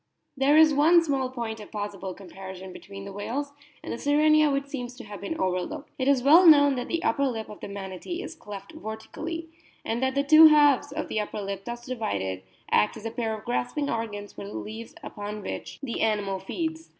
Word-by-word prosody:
There 280 +2 +4
is 315 -1 +7
one 330 +4 +5
small 270 -5 0
point 230 -3 -5
of 210 - -11
possible 200 -3 -5
comparison 190 0 -9
between 195 0 -10
the 200 - -8
whales 275 +8 -4 0.3
and - - -4
the - - -6
Sirenia 305 +1 +4
which 275 0 0
seems 250 -3 -6
to - - -10
have 205 -1 -9
been 325 - -4
overlooked. 185 +7 -2
It 260 - 0
is 275 -3 +3
well 330 +6 +7
known 285 -3 +8
that 245 - -3
the 335 +1 -2
upper 280 -10 +2
lip 225 -4 -4
of 210 - -10
the - - -7
Manatee 200 - -6
is - - -7
cleft 200 -1 -9
vertically, 320 +10 -6 0.4
and 230 +2 -1
that 265 0 0
the 280 - +2
two 310 +2 +9
halves 290 -2 +5
of 310 +2 -4
the 215 - -1
upper 210 0 -4
lip 195 -1 -5
thus 240 0 -6
divided 100 - -3 0.3
act 105 - +3
as 215 - -11
a 225 - -2
pair 225 -2 -2
of 215 - -14
grasping 245 +4 -1
organs 205 -3 -4
for - - -8
the 200 - -8
leaves 225 +2 -8 0.2
on 210 0 -5
which - - -6
the 245 -4 -3
animal 205 -3 0
feeds. 320 - -4
240 Hz, 210 wpm, -26 LUFS, 205-285 Hz, 0.4 s, two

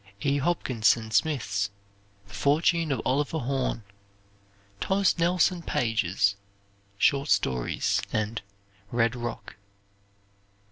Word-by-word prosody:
E. 140 0 +2
Hopkinson 120 -7 +1
Smith's 110 -7 0 0.6
"The 105 - -15
Fortune 155 - +2
of 130 -5 -1
Oliver 145 +4 0
Horn." 130 -4 -2 1.0
Thomas 195 0 +2
Nelson 175 +1 +2
Page's 100 - +1 0.6
"Short 140 +6 +2
Stories," 65 -2 +1
and 110 +1 -2 0.5
"Red 115 0 +1
Rock." 120 -1 -6
125 Hz, 90 wpm, -27 LUFS, 110-155 Hz, 1.0 s, E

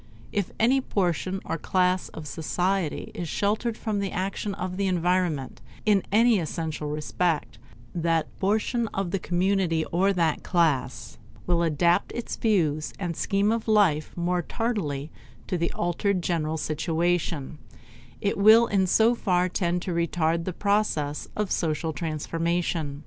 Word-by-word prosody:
If 200 -3 -1
any 255 +4 +4
portion 185 -3 -1
or 165 - -3
class 185 +1 +1
of 155 - -9
society 175 +2 -1
is 170 -3 -5
sheltered 215 +5 0
from 215 -2 -2
the 195 -1 -2
action 195 +2 -3
of 185 -1 -4
the 195 0 0
environment 175 -6 0 0.2
in 205 -3 +4
any 225 0 +5
essential 160 -2 -3
respect, 155 - -1 0.3
that 165 -1 +1
portion 220 +4 +1
of 195 -3 -1
the 195 - 0
community, 180 -2 +1
or 190 +3 +3
that 165 -5 +1
class, 150 -8 0 0.3
will 175 -1 +2
adapt 170 +1 +2
its 240 - -4
views 160 -9 +1
and 180 -3 -2
its 165 - -7
scheme 200 +2 +2
of 230 0 -2
life 195 -9 +3
more 175 +1 0
tardily 165 - -2 0.3
to - - -2
the 170 -1 0
altered 180 +2 0
general 160 -2 -1
situation; 160 -1 -1 0.6
it 200 0 0
will 220 +3 +7
in 195 -4 +1
so 225 +5 +4
far 180 -6 +1
tend 175 -1 -1
to 180 - -3
retard 170 0 0
the 185 - -2
process 180 -7 0
of 210 -3 -2
social 160 -1 -1
transformation. 165 -1 -2
175 Hz, 145 wpm, -26 LUFS, 160-200 Hz, 0.6 s, will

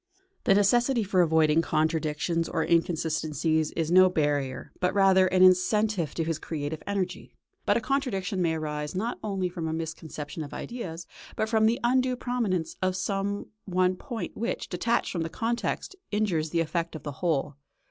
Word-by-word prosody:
The 195 - +5
necessity 235 +4 +3
for 185 -2 +2
avoiding 160 -1 +4
contradictions 160 +1 0
or 160 - 0
inconsistencies 160 -2 +1
is 165 -1 -1
no 185 +1 +7
barrier, 145 -6 -1
but 180 +1 0
rather 190 -1 +5
an 185 0 +4
incentive 185 -2 +3
to 165 - 0
his 160 -1 -2
creative 155 0 -4
energy. 195 -3 -3 0.3
But - - +4
a - - -1
contradiction 215 -7 -1
may 165 -2 +1
arise 150 0 -4
not 225 +6 -2
only 195 -3 -1
from 175 -2 -4
a 160 - -2
misconception 160 -1 -5
of 145 - -8
ideas, 175 -9 -6 0.3
but 220 - -1
from 220 -1 +4
the 235 +2 +1
undue 255 +1 +2
prominence 230 -9 -1
of 185 0 +1
some 195 +1 -2
one 185 -1 +2
point 235 +3 -6
which, 230 +3 -3
detached 230 +6 0
from 170 - -2
the 165 - -2
context, 235 - -2
injures 190 -7 0
the 165 +1 +1
effect 170 +1 -2
of 155 - -8
the 145 - -4
whole. 150 -5 0
180 Hz, 170 wpm, -27 LUFS, 160-205 Hz, 0.3 s, no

